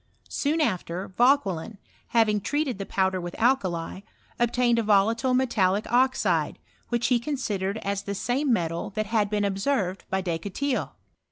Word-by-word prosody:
Soon 305 +3 0
after, 185 - -2
Vauqiielin, 220 - +1 0.3
having 215 -3 +2
treated 280 -2 -1
the 195 - -5
powder 190 -1 0
with 175 0 -6
alkali, 190 -9 0 0.4
obtained 240 0 +2
a - - +3
volatile 225 +4 +3
metallic 210 -6 +2
oxide, 260 +2 +2 0.3
which 240 -1 0
he 245 -2 +3
consi 240 -6 -2
dered 195 +3 -2
as 200 0 -1
the 200 0 -4
same 255 +7 0
metal 170 -5 -1
that 215 0 0
had 210 -1 +1
been 205 -1 0
observed 195 -1 -1
\>j 190 0 +1
Descotils. 200 - -2
210 Hz, 150 wpm, -26 LUFS, 190-250 Hz, 0.4 s, a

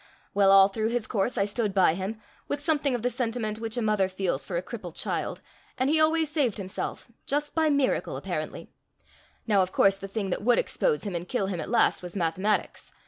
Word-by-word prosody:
Well, 200 -1 +4
all 195 0 +8
through 215 +2 -2
his 235 -2 -1
course 230 +2 -1
I 195 - +2
stood 210 -1 -2
by 185 -4 +5
him, 195 +5 -4 0.3
with 285 - -2
something 290 -3 +1
of 235 - -4
the 245 - +2
sentiment 230 -3 -2
which 225 +1 -4
a 240 - 0
mother 210 -3 +2
feels 185 -7 -2
for 175 - -2
a - - 0
crippled 180 -5 -8
child; - - -3 0.4
and 260 +2 +1
he 310 0 +4
always 315 -1 +3
saved 275 -9 +1
himself&#8212just 240 +8 -4
by 320 -1 +2
miracle, 280 -3 +1
apparently. - - -5 0.7
Now 205 -4 +3
of 185 0 -1
course 195 0 +4
the 195 - -7
thing 195 -1 -3
that - - -1
would 240 +3 +3
expose 475 -3 0
him 200 -3 -4
and 175 +1 -4
kill 245 -6 0
him 185 -4 -3
at - - -6
last 235 - +3
was 180 0 -8
mathematics. 185 +4 -1
215 Hz, 210 wpm, -27 LUFS, 195-250 Hz, 0.7 s, all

